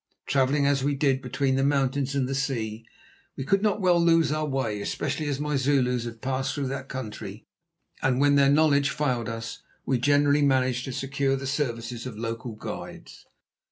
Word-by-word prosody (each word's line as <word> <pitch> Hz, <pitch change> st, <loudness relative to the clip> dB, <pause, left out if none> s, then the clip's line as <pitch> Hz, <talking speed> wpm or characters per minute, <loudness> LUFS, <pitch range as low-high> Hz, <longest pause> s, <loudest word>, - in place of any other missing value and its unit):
Travelling 140 Hz, +1 st, +2 dB
as 140 Hz, -1 st, +2 dB
we 145 Hz, +1 st, +1 dB
did, 135 Hz, -1 st, +1 dB
between 130 Hz, +1 st, 0 dB
the 135 Hz, -, +2 dB
mountains 140 Hz, 0 st, +1 dB
and 135 Hz, -2 st, +1 dB
the 135 Hz, -, -2 dB
sea, 115 Hz, -5 st, -2 dB, 0.5 s
we -, -, -3 dB
could 195 Hz, +8 st, +2 dB
not 210 Hz, -1 st, +1 dB
well 175 Hz, -2 st, +4 dB
lose 165 Hz, -2 st, +4 dB
our 155 Hz, 0 st, -1 dB
way, 130 Hz, -7 st, -2 dB
especially 150 Hz, +8 st, -2 dB
as 140 Hz, -2 st, -2 dB
my 150 Hz, 0 st, -1 dB
Zulus 130 Hz, -3 st, +1 dB
had 115 Hz, -1 st, -8 dB
passed 135 Hz, 0 st, -1 dB
through 140 Hz, -2 st, -2 dB
that 135 Hz, 0 st, -5 dB
country; 105 Hz, -5 st, -7 dB, 0.6 s
and 130 Hz, -1 st, +1 dB
when 145 Hz, 0 st, +4 dB
their 140 Hz, -1 st, +5 dB
knowledge 145 Hz, -1 st, +4 dB
failed 130 Hz, -6 st, -1 dB
us, 115 Hz, 0 st, -6 dB, 0.2 s
we 130 Hz, -2 st, +1 dB
generally 145 Hz, +2 st, +3 dB
managed 130 Hz, -3 st, +2 dB
to 135 Hz, -, -5 dB
secure 135 Hz, +1 st, -1 dB
the 135 Hz, 0 st, -5 dB
services 120 Hz, -4 st, -3 dB
of 115 Hz, -4 st, -8 dB
local 115 Hz, +1 st, -4 dB
guides. 110 Hz, -, -8 dB
135 Hz, 185 wpm, -26 LUFS, 125-145 Hz, 0.6 s, their